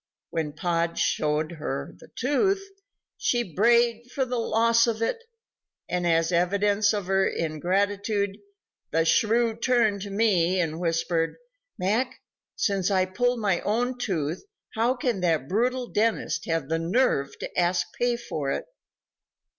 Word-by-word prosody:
When 160 -3 -2
Pod 170 -1 -1
showed 155 +1 0
her 140 -2 -4
the - - -15
tooth, 385 - +1 0.5
she 240 -8 0
brayed 235 +3 +3
for 265 - 0
the 250 -1 -2
loss 230 +1 +3
of 225 -2 -1
it, 460 - -1 0.6
and 175 0 -1
as 165 0 +2
evidence 200 +4 +2
of 205 -3 -2
her 190 +1 +2
ingratitude, 200 +5 -1 0.5
the 165 +1 +1
shrew 225 +6 +3
turned 230 -4 +2
to 200 - -5
me 190 -4 +2
and 160 -2 -1
whispered: 165 -1 0 0.4
"Mac, 235 +8 0 0.4
since 195 -2 0
I 190 -2 +2
pulled 245 +5 0
my 195 -4 +1
own 245 +4 -1
tooth, 165 -7 -2 0.3
how 235 +3 +1
can 245 -5 -1
that 160 -6 +1
brutal 250 - 0
dentist 225 0 -1
have 165 -4 -1
the 165 +2 0
nerve 165 - +1
to - - -7
ask 175 +1 +2
pay 240 0 0
for 155 -12 -4
it?" - - -2
200 Hz, 140 wpm, -26 LUFS, 170-235 Hz, 0.6 s, brayed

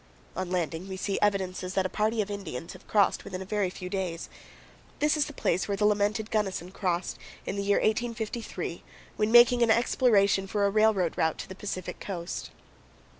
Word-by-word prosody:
On 185 -1 -3
landing, 175 0 -2
we 190 - -5
see 195 +1 -1
evidences 190 -2 0
that 190 - +2
a - - +3
party 215 +3 0
of 205 - -8
Indians 170 -7 -6
have - - -15
crossed 205 -2 +3
within 185 -1 -6
a 190 - -6
very 205 -1 0
few 180 0 -7
days. 180 -3 -3 0.7
This 300 +1 +2
is 300 -1 +1
the - - -7
place 185 - 0
where 200 -1 -1
the 210 - +2
lamented 210 +1 +1
Gunnison 190 -4 -1
crossed, 180 -2 -2 0.3
in - - -3
the 200 - -1
year 200 0 +2
1853, 230 0 -2 0.3
when 215 +1 +1
making 240 +1 +7
an 235 - +4
exploration 215 -4 +3
for 205 +1 +1
a 200 - +2
railroad 215 -5 +3
route 160 -1 +2
to - - -6
the 190 - -7
Pacific 185 -2 -5
coast. 175 -3 -5
200 Hz, 190 wpm, -28 LUFS, 185-215 Hz, 0.7 s, making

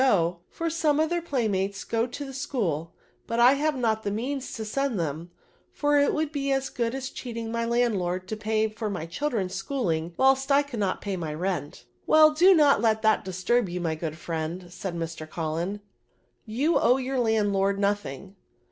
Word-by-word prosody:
go, 175 -8 +2
for 335 - -4
some 315 -3 +1
of 315 +1 +1
tibeir 345 -1 0
playmates 200 - -1
go 230 +1 0
to 270 +4 -6
the 270 - -7
VERBS, 270 - -5
71 255 -5 0
l^hool; 155 +3 -5 0.4
but 230 - -1
I 245 +3 +7
have 300 +1 0
not 220 -3 +1
the 205 - -2
means 255 +6 -3
to 220 - -5
send 260 0 -1
them, 160 +1 -3 0.4
for 290 0 +2
it 285 - +3
would 310 -1 -1
be 275 -2 -1
as 270 0 0
good 235 +1 -1
as 270 0 -4
cheating 230 -2 -6
mj 230 0 -1
landlord 190 -7 0
to 220 - -2
pay 220 0 0
for 215 0 -4
my 180 -5 -4
children's 200 - -2
schooling, 175 - -2
"whilst 270 +1 +3
I 280 +1 +5
can't 220 -9 -2
pay 200 -2 -3
my 155 -3 -4
rent/' 165 -7 -3
" - - -41
Well, 310 0 +7
do 365 +5 +6
not 290 -8 +5
let 220 -1 +2
that 220 0 +3
disturb 190 +4 0
you, 180 +1 -3
my 165 -2 -1
good 155 -1 -5
friend," 170 +2 -5
said 185 -2 -5
Mr. 165 -1 -5
Cullen, 170 +6 -3 0.7
you 275 +10 +2
owe 250 +2 +4
your 265 0 -2
landlord 205 -4 +2
no 200 0 +3
thing." 195 0 -9
220 Hz, 200 wpm, -26 LUFS, 185-270 Hz, 0.7 s, I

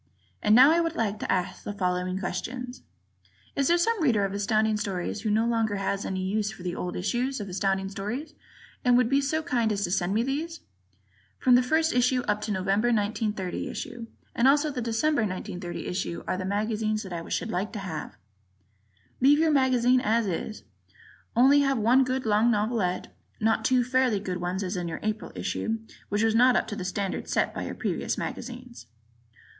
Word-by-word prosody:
And 210 +1 +4
now 260 +5 +8
I 335 - +4
would 330 0 -2
like 215 -5 -1
to - - -2
ask 180 -1 -1
the 205 - -4
following 180 -1 -1
questions: 250 +6 -5 0.7
Is 275 -1 +1
there 345 - +4
some 435 +3 +1
Reader 225 -9 +3
of 195 - -3
Astounding 215 +2 +1
Stories 200 -1 -3
who 220 - -1
no 220 +2 +2
longer 225 -3 +1
has 195 0 -2
any 185 -1 -2
use 205 +2 0
for 215 -4 -10
the 180 -1 -2
old 180 0 -4
issues 245 +8 -1
of 205 - -5
Astounding 195 +1 -1
Stories 215 +11 -5 0.5
and 245 -1 +5
would 250 -2 +3
be 275 +1 +3
so 310 +3 -1
kind 240 -8 +1
as 200 -1 -1
to 175 - -1
send 190 +1 0
me 225 - +2
these? 315 +6 -3 0.8
From 255 - +3
the 245 - +7
first 315 +5 +1
issue 250 +1 +2
up 210 0 -1
to - - -4
the 195 - 0
November, 195 +5 +1
1930, 210 -4 -1
issue 235 -1 -6 0.3
and 235 - +3
also 295 +2 +4
the 255 -3 -4
December, 240 +5 +1
1930, 185 -3 -4
issue 180 -1 -3
are - - 0
the 185 0 -4
magazines 215 +2 -1
that 190 -3 -7
I 165 -1 -6
should 225 - -2
like 195 +3 -2
to - - -4
have. 180 -6 -6 1.0
Leave 280 +3 +6
your 320 0 +3
magazine 255 -2 +3
as 225 +1 +2
is, 200 +3 -4 0.7
only 270 +5 +6
have 275 -2 +2
one 240 +5 +4
good 260 0 -2
long 215 +2 +3
novelette, 210 -4 -1 0.2
not 220 0 +1
two 250 +2 +3
fairly 250 -3 +2
good 185 -2 -4
ones 180 +2 -2
as 185 +1 -3
in 175 -1 -3
your 165 - -4
April 215 0 -3
issue, 225 0 -2 0.3
which 205 +1 +1
was 225 -1 +3
not 250 +2 +5
up - - +2
to 210 - -4
the 195 - -5
standard 195 +1 -3
set - - +1
by - - -4
your - - -5
previous - - -2
magazines. 245 - -7
220 Hz, 200 wpm, -27 LUFS, 195-250 Hz, 1.0 s, now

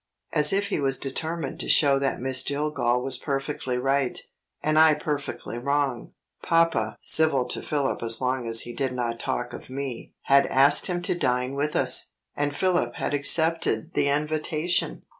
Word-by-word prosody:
As 150 0 +7
if 200 +1 0
he - - -2
was 135 -1 +2
determined 155 +2 -4
to - - -4
show 140 -2 +4
that 135 -1 -2
Miss 130 +1 +2
Jillgall 140 -4 -1
was 135 0 0
perfectly 135 -3 -4
right, 135 0 -1 0.4
and 155 0 +2
I 160 -1 +6
perfectly 145 -6 -5
wrong, 140 -2 -2 0.3
papa 165 -10 +1
(civil 155 -5 +2
to - - -2
Philip 145 -3 -2
as 115 -1 +2
long 130 -1 -2
as 115 0 +3
he 120 - -8
did 130 0 -3
not 120 -2 -3
talk 120 0 -4
of - - -11
Me) 130 -2 -7
had 140 0 +3
asked 140 +2 +5
him 175 -2 -3
to - - -1
dine 125 -5 -1
with 145 +2 -3
us, - - +3 0.2
and 145 0 -2
Philip 175 -11 0
had - - -3
accepted 160 -4 +2
the - - 0
invitation! 155 +3 -1
140 Hz, 170 wpm, -24 LUFS, 125-155 Hz, 0.4 s, As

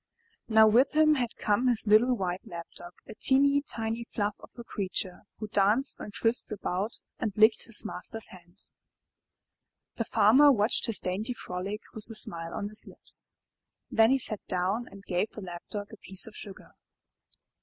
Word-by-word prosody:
Now 220 -1 +6
with 240 +7 +3
him 310 0 +5
had 245 -5 -2
come 215 +4 0
his 235 -3 +1
little 230 +4 +4
white 185 -1 -4
Lap 170 -1 -8
dog, 175 0 -10
a - - -10
teeny, 280 +4 +3
tiny 225 -3 -4
fluff 210 -2 -3
of - - -14
a 235 - -8
creature, 190 -4 -4
who 215 - -6
danced 210 +7 +1
and 210 - -8
frisked 230 0 0
about 205 +1 -3 0.2
and 220 -4 -2
licked 220 +1 +4
his 230 -1 -3
master's 215 +2 -3
hand. 180 +1 -13 1.3
The 230 - -2
Farmer 265 +10 +5
watched 220 0 +2
his 225 -4 +2
dainty 205 +7 -3
frolic 195 +1 -6
with 220 0 0
a 225 - -5
smile 165 -5 +1
on 205 - -4
his 215 - -4
lips. - - -10 0.6
Then 225 0 +4
he 270 - +3
sat 215 -5 +8
down 190 +6 -1
and 200 0 -14
gave 180 +4 -1
the 215 - -8
Lap 175 -2 -8
dog 205 +1 -6
a - - -10
piece 190 -1 -2
of 220 - -12
sugar. 200 -2 -8
215 Hz, 175 wpm, -28 LUFS, 195-235 Hz, 1.3 s, sat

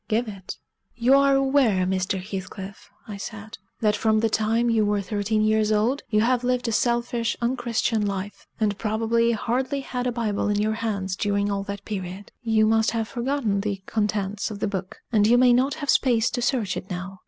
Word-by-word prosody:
"Give 230 +2 0
it." 195 -3 -8 0.4
"You 240 +3 +3
are 275 0 +5
aware, 265 -9 +3
Mr. 190 +1 -1
Heathcliff," 190 0 -7 0.2
I 210 -2 -6
said, 215 +1 -8 0.2
"that 210 -1 +3
from 220 0 +2
the 225 0 +1
time 225 +2 +1
you 225 -2 +3
were 205 0 +1
thirteen 215 +2 0
years 215 0 +2
old 225 +7 +1
you 215 -1 +3
have 245 +2 +2
lived 250 0 0
a - - 0
selfish, 235 0 0
unchristian 235 -2 0
life: 200 +1 -5
and 210 -2 0
probably 230 +2 +1
hardly 260 +5 -1
had 250 -2 -3
a - - +1
Bible 215 -3 -1
in 205 0 +1
your 215 +1 +1
hands 200 -4 -2
during 200 +1 0
all 200 0 -1
that 200 0 -6
period. 190 -1 -6
You 220 -2 +3
must 220 0 +3
have 225 -1 -1
forgotten 240 -5 -1
the 200 -2 -3
contents 205 -2 -1
of 210 - -6
the 210 - -1
book, 190 -2 -5
and 210 -2 +4
you 240 +2 +5
may 250 0 +6
not 260 +3 +2
have 290 -3 -6
space 235 -4 +2
to 245 - -2
search 235 -6 0
it 185 - -6
now. 185 +1 -6
220 Hz, 200 wpm, -24 LUFS, 200-240 Hz, 0.4 s, may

